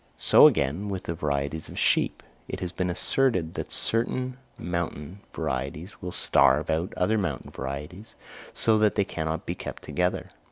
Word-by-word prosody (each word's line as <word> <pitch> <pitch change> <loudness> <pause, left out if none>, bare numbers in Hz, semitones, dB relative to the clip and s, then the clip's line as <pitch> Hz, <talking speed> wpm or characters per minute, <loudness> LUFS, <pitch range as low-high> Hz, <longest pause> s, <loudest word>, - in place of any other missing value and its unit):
So - - +8
again 80 +10 0
with 95 -2 -3
the 85 - -3
varieties 75 -1 -2
of - - -9
sheep: - - +2 0.2
it - - -5
has 90 -2 -3
been 90 -1 -2
asserted 90 -2 +1
that - - -5
certain 125 +2 0 0.2
mountain 85 0 -4
varieties 70 +9 -4
will 90 - -4
starve 80 - +3
out 80 +3 0
other 110 +4 +2
mountain 85 -9 -3
varieties, 75 +10 -6 0.4
so 110 -1 +2
that 105 -1 +3
they 100 - +2
cannot 80 -3 -3
be - - -2
kept - - -7
together. 90 0 -1
90 Hz, 160 wpm, -27 LUFS, 80-100 Hz, 0.4 s, So